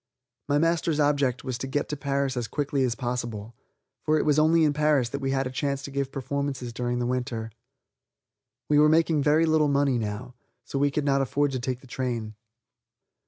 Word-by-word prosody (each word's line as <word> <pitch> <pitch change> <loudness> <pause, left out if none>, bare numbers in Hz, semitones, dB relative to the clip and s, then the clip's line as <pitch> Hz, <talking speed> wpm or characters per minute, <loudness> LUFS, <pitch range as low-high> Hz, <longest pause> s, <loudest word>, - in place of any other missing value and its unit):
My 145 - +3
master's 165 0 +1
object 145 -4 +1
was 130 -2 -4
to 135 - -4
get 145 +2 -1
to 150 - -2
Paris 140 -1 -1
as 120 -2 -2
quickly 145 -2 -1
as 120 -2 0
possible, 120 -4 -4 0.5
for 155 0 +2
it - - 0
was 150 0 +3
only 160 +1 +4
in 150 -2 +3
Paris 150 -5 +2
that 140 - -4
we 135 -1 -2
had 135 0 0
a 125 - -4
chance 140 0 -2
to 140 - -7
give 140 -1 -2
performances 135 -2 -3
during 120 +1 -2
the 120 - -1
winter. 120 -3 -3 1.2
We 150 -1 +4
were 150 0 +6
making 160 -1 +3
very 150 +3 +4
little 155 -1 +3
money 140 -3 +2
now, 110 +4 -5 0.3
so 135 - -3
we 145 +1 +3
could 145 +1 -2
not 140 -1 +2
afford 140 +2 0
to 130 - -2
take 125 0 -3
the - - -16
train. 120 -3 -3
135 Hz, 205 wpm, -26 LUFS, 125-145 Hz, 1.2 s, were